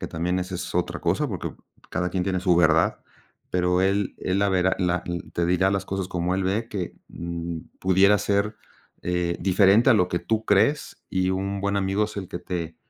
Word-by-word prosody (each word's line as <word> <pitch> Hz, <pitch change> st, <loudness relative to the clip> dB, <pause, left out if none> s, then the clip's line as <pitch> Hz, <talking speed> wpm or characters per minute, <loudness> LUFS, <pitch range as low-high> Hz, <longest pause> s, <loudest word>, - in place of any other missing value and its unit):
que -, -, -4 dB
también 90 Hz, +3 st, -1 dB
esa 90 Hz, 0 st, -4 dB
es 90 Hz, -, -6 dB
otra 90 Hz, 0 st, -1 dB
cosa, -, -, 0 dB
porque -, -, -5 dB, 0.4 s
cada 90 Hz, 0 st, -1 dB
quien 90 Hz, 0 st, -1 dB
tiene 95 Hz, -1 st, -1 dB
su 90 Hz, -2 st, +3 dB
verdad, 80 Hz, -1 st, +3 dB, 0.5 s
pero 90 Hz, 0 st, +2 dB
él 100 Hz, +1 st, +1 dB
él 95 Hz, +1 st, -1 dB
la 100 Hz, -, +3 dB
verá, 95 Hz, 0 st, +2 dB
la 90 Hz, -1 st, 0 dB, 0.3 s
te 85 Hz, -, +1 dB
dirá 90 Hz, +2 st, +2 dB
las 95 Hz, -1 st, -1 dB
cosas 95 Hz, -1 st, -3 dB
como 90 Hz, 0 st, -1 dB
él 95 Hz, -, 0 dB
ve, 105 Hz, +5 st, -1 dB
que, 95 Hz, -6 st, -4 dB
mm, 85 Hz, 0 st, -5 dB, 0.2 s
pudiera 95 Hz, +2 st, +4 dB
ser, 100 Hz, +2 st, 0 dB, 0.5 s
eh, 90 Hz, -1 st, -1 dB
diferente 100 Hz, +5 st, +5 dB
a -, -, +7 dB
lo 90 Hz, -4 st, +3 dB
que 90 Hz, -, -1 dB
tú 110 Hz, +3 st, -1 dB
crees 140 Hz, +9 st, +1 dB
y 95 Hz, -1 st, +1 dB
un 100 Hz, +1 st, -2 dB
buen 100 Hz, 0 st, 0 dB
amigo 100 Hz, +2 st, +1 dB
es 105 Hz, 0 st, -8 dB
el 95 Hz, -3 st, -5 dB
que 85 Hz, -, -5 dB
te 85 Hz, -3 st, -5 dB
95 Hz, 205 wpm, -25 LUFS, 90-100 Hz, 0.5 s, a